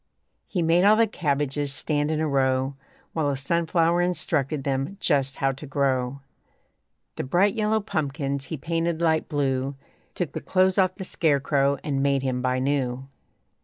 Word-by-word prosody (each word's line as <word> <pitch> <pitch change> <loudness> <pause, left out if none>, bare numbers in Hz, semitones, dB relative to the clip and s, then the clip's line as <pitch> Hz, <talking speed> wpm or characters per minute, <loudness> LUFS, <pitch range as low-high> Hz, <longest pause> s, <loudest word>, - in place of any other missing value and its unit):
He 180 -4 -1
made 165 +2 +3
all 210 +2 +6
the 230 +1 +4
cabbages 145 -6 -1
stand 145 +1 0
in 155 -1 0
a 160 - 0
row 135 -1 +1 0.4
While 155 -3 0
a 140 - -1
sunflower 170 +3 +1
instructed 155 -5 0
them 135 +7 -2
just 140 -6 +1
how 135 0 +1
to 140 +3 -9
grow; 135 -1 0 1.0
The - - -2
bright 180 +9 +2
yellow 220 -1 +1
pumpkins 140 -6 -2
he 160 - -5
painted 165 +2 -1
light 160 -2 +1
blue; 135 -2 -1 0.4
Took 175 -5 -2
the - - -5
clothes 185 0 +2
off 185 -1 +2
the 195 - -6
scare 155 -5 +1
crow 140 0 +1
and 140 -3 -1
made 140 -1 +1
him 130 -1 -1
buy 130 0 0
new. 130 -1 -1
145 Hz, 165 wpm, -25 LUFS, 135-170 Hz, 1.0 s, all